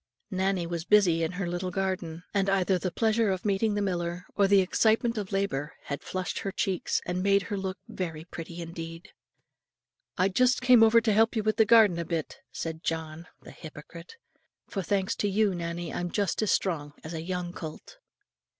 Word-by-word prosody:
Nannie 190 -1 0
was 170 -1 -4
busy 180 -4 +4
in 165 +2 -1
her 185 +1 -3
little 175 +1 -2
garden; 180 -3 -3
and 195 -1 +1
either 190 -1 +2
the 185 - -1
pleasure 220 +3 +1
of 190 0 -2
meeting 205 +1 +1
the 205 - 0
miller, 175 -1 -2
or 200 -1 +4
the 200 0 +6
excitement 220 +5 +2
of 205 -3 -4
labour 175 -7 -2
had 140 - -5
flushed 185 -1 -4
her 195 - -3
cheeks, 190 -1 -1
and 180 +1 -2
made 200 +1 +3
her 205 - -4
look 190 0 -3
very 165 -4 -5
pretty 170 0 -7
indeed. 165 0 -8 1.1
"I 185 +1 +3
just 250 +6 +3
came 250 -2 +6
over 225 +1 +6
to 220 -2 +2
help 225 +3 +3
you 220 - 0
with 215 0 0
the 220 - +5
garden 210 -6 +6
a 170 - -2
bit," 160 -1 -4
said 160 0 -5
John, 160 +1 -4 0.2
the - - -11
hypocrite! 165 - -11 0.5
"for 195 - -3
thanks 190 +1 0
to 205 - 0
you, 205 0 +2
Nannie, 170 -1 -4
I'm 175 0 -2
just 200 +2 -1
as 215 - +1
strong 150 -6 -1
as 155 - -7
a 160 - -4
young 175 0 -4
colt." 165 - -9
185 Hz, 195 wpm, -28 LUFS, 170-205 Hz, 1.1 s, the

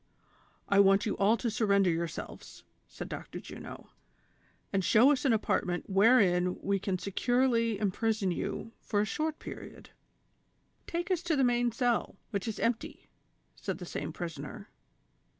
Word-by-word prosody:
" - - -35
I 200 - +4
want 195 0 +5
you 210 - -1
all 210 +4 +4
to 230 +1 -2
surrender 200 -4 +3
yourselves," 165 0 -5 0.2
said - - -8
Dr. - - -7
Juno, - - -10 0.8
"and 195 -1 +1
show 235 +9 +6
us 285 0 0
an 265 - +4
apartment 180 -5 0
wherein 195 -4 +4
we 200 0 0
can 190 -1 -1
securely 230 +3 +1
im 200 -1 0
prison 215 -2 0
you 225 +5 -4
for 205 - -1
a - - +1
short 310 +8 -2
period." - - -10 1.0
"Take 345 +2 -3
us 360 -3 +1
to 340 -3 0
the 270 - +2
main 240 -1 +2
cell, 240 0 0 0.2
which 200 -2 -2
is 220 - -4
empty," 230 0 -2 0.5
said - - -4
the - - -7
same - - -4
prisoner. - - -7
220 Hz, 155 wpm, -30 LUFS, 195-245 Hz, 1.0 s, show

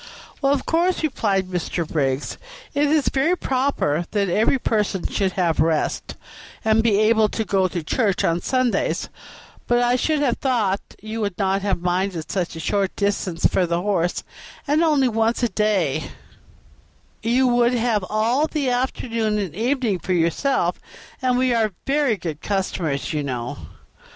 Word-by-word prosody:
"Well, 275 -1 +3
of 280 -2 0
course," 345 +2 +1
replied 205 -10 0
Mr. 175 -2 -3
Briggs, 135 -3 -1 0.3
"it 285 +1 +2
is 295 -1 +2
very 315 +7 +1
proper 255 - 0
that 200 -3 0
every 215 +9 +3
person 210 -6 -1
should 190 -2 0
have 175 -4 0
rest, 160 -1 0 0.5
and 220 0 +4
be 220 -3 +3
able 220 0 +4
to 220 - -2
go 190 -1 +2
to 175 -3 -4
church 200 +3 0
on 170 +1 +1
Sundays, 255 +1 0 0.6
but 240 - +3
I 245 +1 +3
should 310 +5 +1
have 245 -4 +1
thought 220 -7 +1 0.2
you 220 +1 -4
would 200 -4 -2
not 195 0 +1
have 195 -3 -1
minded 180 -2 -1
such 180 -3 -2
a - - -6
short 195 +3 -1
distance 200 -4 -1
for 180 - +3
the 170 0 0
horse, 180 -4 0 0.4
and 295 +3 +3
only 295 -5 +3
once 225 +1 0
a 240 - +3
day; 185 -8 0 1.2
you 240 +4 +2
would 240 0 +3
have 230 -4 +1
all 230 +8 +2
the 290 -5 -1
afternoon 230 -3 -1
and 195 -7 -3
evening 235 -2 0
for 185 - -2
yourself, 175 - +1 0.4
and 255 -1 +2
we 255 -1 +2
are 220 -3 +1
very 275 -5 +2
good 160 -5 -5
customers, 180 -8 -2
you 150 - 0
know." 125 -4 -4
215 Hz, 160 wpm, -22 LUFS, 180-250 Hz, 1.2 s, and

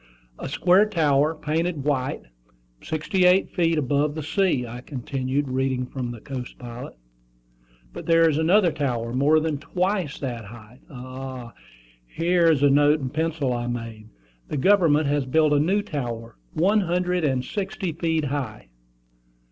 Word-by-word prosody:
"'A - - -5
square 185 +4 +4
tower, 155 -5 +2
painted 155 0 -2
white, 135 -3 -1 0.6
sixty 160 +4 0
eight 180 +2 +4
feet 165 -3 +1
above 145 +1 0
the 155 - -4
sea,'" 160 -5 +1
I 120 +1 -8
continued, 135 +1 -3
reading 130 0 -1
from 125 -1 -5
the 120 -1 -7
Coast 125 +1 -7
Pilot. 120 0 -9 1.0
"But - - -8
there 165 0 +5
is 155 -1 +1
another 175 +3 +4
tower, 120 -6 -2
more 145 +5 +4
than 155 -2 -2
twice 180 -1 -1
that 120 -5 -5
height. 115 +3 -13
Ah, 130 -2 -8 0.5
here 170 - +2
is 150 -4 +3
a 145 - +6
note 145 +2 +4
in 130 -3 -3
pencil 155 -4 -1
I 120 0 -3
made: 115 -3 -6 0.4
'The 150 - -3
government 160 -2 +4
has 140 -1 0
built 155 +2 +3
a 145 - +4
new 195 +7 +1
tower, 120 - -5 0.2
one 200 +7 +3
hundred 180 0 0
and 130 -4 0
sixty 190 -1 -3
feet 160 -1 -1
high.'" 130 - -4
145 Hz, 155 wpm, -24 LUFS, 130-165 Hz, 1.0 s, a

